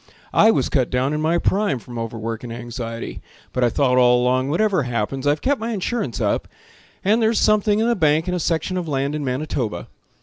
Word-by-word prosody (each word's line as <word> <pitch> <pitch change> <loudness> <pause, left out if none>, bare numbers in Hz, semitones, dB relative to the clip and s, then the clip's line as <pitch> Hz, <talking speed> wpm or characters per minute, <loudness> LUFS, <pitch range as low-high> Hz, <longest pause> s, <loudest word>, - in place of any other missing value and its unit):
I 220 - +6
was 225 - +2
cut 130 -5 +1
down 130 +3 0
in 150 - -1
my 165 +2 +2
prime 195 -4 +1
From 120 0 -8
overwork 115 0 -4
and 120 - -6
anxiety. 115 -1 -6 0.3
But 125 - 0
I 120 - +4
thought 125 +1 +2
all 125 0 +5
along, 130 +2 +1
whatever 190 +2 +2
happens 125 +2 -2
I've 145 +1 +2
kept 275 -3 +1
my 230 +1 -2
insurance 205 - -2
up, - - 0 0.6
And 215 +4 +3
there's 220 0 +2
something 215 -1 +3
in 225 +2 +1
the 235 - +2
bank, 155 -2 +2
And 180 - -1
a - - -1
section 170 +3 -1
of 175 -2 -3
land 140 -1 -1
in 150 -1 -3
Manitoba. 125 - -3
145 Hz, 210 wpm, -21 LUFS, 125-185 Hz, 0.6 s, I